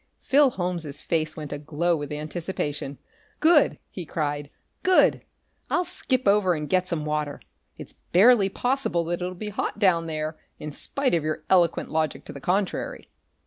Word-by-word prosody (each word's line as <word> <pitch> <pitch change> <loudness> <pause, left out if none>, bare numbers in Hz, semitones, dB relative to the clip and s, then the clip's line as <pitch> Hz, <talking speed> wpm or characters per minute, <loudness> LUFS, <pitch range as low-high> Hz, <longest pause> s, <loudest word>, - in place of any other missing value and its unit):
Phil 280 0 +5
Holmes' 175 - -3
face 155 -1 -1
went 150 -2 -5
aglow 155 +4 0
with 145 -2 -5
anticipation. 150 -2 -4 0.4
"Good!" 315 -2 +5
he 180 - -6
cried. 145 -2 -3 0.3
"Good! 370 -1 +4 0.5
I'll 360 - +1
skip 260 - -1
over 200 -3 +4
and 150 -1 -4
get 185 +1 +1
some 165 -4 -2
water. 150 -1 -2 0.4
It's - - -10 0.2
barely 200 +2 +6
possible 245 -6 0
that 175 +2 -3
it'll 180 +1 -3
be 210 +4 -5
hot 210 - -3
down 180 -5 +3
there, 155 0 -3 0.2
in 150 - -6
spite 270 - -2
of 165 -3 +2
your 155 0 -3
eloquent 175 -3 +3
logic 155 -1 -1
to - - -8
the 140 - -9
contrary!" 185 +5 -2
170 Hz, 160 wpm, -25 LUFS, 155-200 Hz, 0.5 s, barely